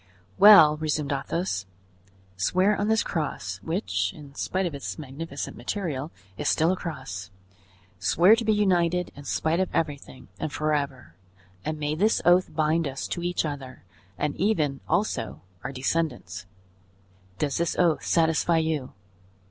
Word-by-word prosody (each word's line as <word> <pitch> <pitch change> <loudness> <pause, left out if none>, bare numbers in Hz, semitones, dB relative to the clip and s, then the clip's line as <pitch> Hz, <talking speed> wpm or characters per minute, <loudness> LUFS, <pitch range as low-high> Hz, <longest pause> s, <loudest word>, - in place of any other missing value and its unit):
"Well," 165 -8 +9
resumed 150 -2 -1
Athos, 140 - -2 0.7
"swear 185 - +2
on 205 - -1
this 220 0 +3
cross, 100 - -3
which, 175 - -1
in 145 -3 -12
spite 185 +6 -1
of 170 - -3
its 140 - -5
magnificent 145 0 -6
material, 150 - -3 0.3
is - - +1
still 160 +3 +3
a - - +1
cross; 100 - -6 0.7
swear 170 - +5
to 230 - -3
be 220 - +2
united 180 -4 +2
in 145 - -11
spite 160 +3 0
of 190 - +1
everything, 145 -4 -3
and 155 - -3
forever, 140 - -2 0.5
and 155 0 -3
may 150 0 -1
this 205 +8 +2
oath 175 0 +4
bind 155 +1 +1
us 135 0 -4
to 175 - -3
each 175 -1 -1
other, 135 -4 -6 0.3
and 150 -1 -1
even, 155 -8 +1
also, 130 - -1 0.2
our 125 - -4
descendants! 130 - -2 0.9
Does 145 -3 -1
this 170 0 0
oath 170 -3 +2
satisfy 165 0 +2
you?" 160 -5 -1
155 Hz, 145 wpm, -26 LUFS, 140-175 Hz, 0.9 s, Well